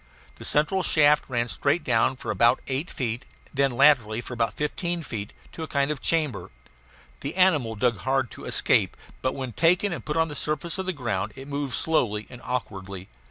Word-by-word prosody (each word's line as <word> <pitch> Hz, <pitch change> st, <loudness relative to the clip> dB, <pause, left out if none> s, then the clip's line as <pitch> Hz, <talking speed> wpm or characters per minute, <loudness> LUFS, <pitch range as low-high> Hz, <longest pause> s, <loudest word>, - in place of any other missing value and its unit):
The -, -, -8 dB
central 155 Hz, +6 st, +2 dB
shaft 150 Hz, -3 st, +4 dB
ran 120 Hz, -2 st, 0 dB
straight 140 Hz, +6 st, +1 dB
down 115 Hz, 0 st, +2 dB
for 130 Hz, -, -4 dB
about 120 Hz, +2 st, +4 dB
eight 135 Hz, +6 st, -2 dB
feet, 120 Hz, -1 st, -3 dB, 0.2 s
and -, -, -26 dB
then 140 Hz, 0 st, +3 dB
laterally 120 Hz, -5 st, +4 dB
for 120 Hz, -, -6 dB
about 115 Hz, -1 st, -1 dB
fifteen 170 Hz, +3 st, -2 dB
feet, 105 Hz, -6 st, -5 dB, 0.2 s
to -, -, -8 dB
a 160 Hz, -, -3 dB
kind 140 Hz, 0 st, +1 dB
of 150 Hz, -, -4 dB
chamber. 145 Hz, -, 0 dB, 0.7 s
The 140 Hz, +4 st, -5 dB
animal 155 Hz, -12 st, +3 dB
dug 115 Hz, +1 st, +1 dB
hard 130 Hz, -2 st, 0 dB
to -, -, -10 dB
escape, -, -, +2 dB, 0.2 s
but 130 Hz, -, -1 dB
when 130 Hz, -2 st, -4 dB
taken 175 Hz, -, +3 dB
and -, -, -6 dB
put 150 Hz, +1 st, -2 dB
on 160 Hz, 0 st, +3 dB
the 150 Hz, -, -6 dB
surface 155 Hz, +5 st, -2 dB
of 190 Hz, -, -3 dB
the -, -, +2 dB
ground 120 Hz, -, -2 dB
it 135 Hz, +1 st, -9 dB
moved 140 Hz, -2 st, -2 dB
slowly 110 Hz, -10 st, +1 dB
and 125 Hz, -, -10 dB
awkwardly. 95 Hz, -6 st, -5 dB
135 Hz, 200 wpm, -26 LUFS, 120-155 Hz, 0.7 s, shaft